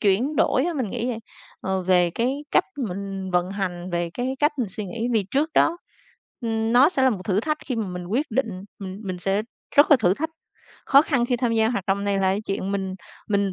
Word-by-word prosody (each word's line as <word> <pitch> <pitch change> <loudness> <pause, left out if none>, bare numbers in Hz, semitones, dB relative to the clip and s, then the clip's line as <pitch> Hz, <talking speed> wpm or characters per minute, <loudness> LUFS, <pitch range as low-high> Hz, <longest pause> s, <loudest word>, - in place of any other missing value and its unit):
chuyển 230 +9 +2
đổi 260 - +3
á, 350 - 0
mình 255 -9 -2
nghĩ 240 0 -2
vậy, 235 -3 -2 0.4
ờ, 190 -1 -1
về 180 -1 +3
cái 260 - -1
cách - - +4 0.2
mình 195 0 -5
vận 180 0 +1
hành, 185 -2 -3
về 170 0 -1
cái 255 +2 -2
cách 295 +2 +3
mình 235 -6 0
suy 205 +2 -5
nghĩ. 225 +6 -3
Vì 215 -3 +2
trước 295 +4 +1
đó, 335 - +4 0.6
ừm, 225 -1 -1
nó 255 +5 +7
sẽ 280 -7 0
là 260 - +5
một 200 -6 -3
thử 200 0 +1
thách 305 +4 -1
khi 255 -4 -2
mà 220 - -1
mình 180 -1 -6
quyết 255 - 0
định, 240 +1 0 0.3
m 200 - -7 0.2
mình 185 -1 -3
sẽ 195 +3 0 0.3
rất 290 - +7
là 290 - +9
thử 185 -3 +3
thách. 320 +8 -3 0.6
Khó 275 +1 +7
khăn 265 -6 +1
khi 245 - +1
tham 240 -1 0
gia 220 -1 +3
hoạt 200 -6 -2
động 200 +1 0
này 200 -1 +1
là - - 0
cái 190 +2 +2
chuyện 195 0 -2
mình 190 -1 -2 0.3
mình 200 -2 +1
215 Hz, 240 wpm, -24 LUFS, 190-255 Hz, 0.6 s, là